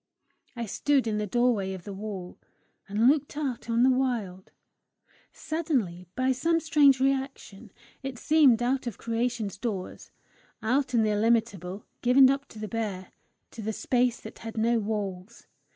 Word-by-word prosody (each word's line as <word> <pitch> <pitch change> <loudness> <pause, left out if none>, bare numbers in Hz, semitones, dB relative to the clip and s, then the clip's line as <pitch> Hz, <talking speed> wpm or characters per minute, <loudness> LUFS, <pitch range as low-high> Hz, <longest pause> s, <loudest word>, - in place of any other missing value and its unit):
I 235 -1 -3
stood 275 +5 +1
in 215 -2 -1
the 210 - -2
doorway 220 -4 +1
of 185 -2 -8
the 200 - -7
wall, 195 -3 -7 0.5
and 215 +4 +3
looked 290 +1 +2
out 260 -6 -3
on 230 +1 +3
the 260 - +6
wild: 230 -8 -2 0.8
suddenly, 255 - -2
by 255 +1 +1
some 330 +6 +1
strange 290 -4 +4
reaction, 265 -6 -2 0.3
it 270 -2 -5
seemed 270 -5 +4
out 255 +1 0
of 230 - -5
creation's 230 -4 -2
doors, 205 -6 -5 0.5
out 255 +3 +1
in 225 - +4
the 215 - +1
illimitable, 210 -3 0 0.2
given 260 +2 +6
up 275 0 -3
to - - -14
the 215 0 -5
bare, 205 -5 -4 0.4
to 225 - -8
the 220 +1 -2
space 245 +1 +1
that 220 - -10
had 225 0 -8
no 230 +1 +2
walls! 205 0 -4
230 Hz, 155 wpm, -27 LUFS, 210-260 Hz, 0.8 s, the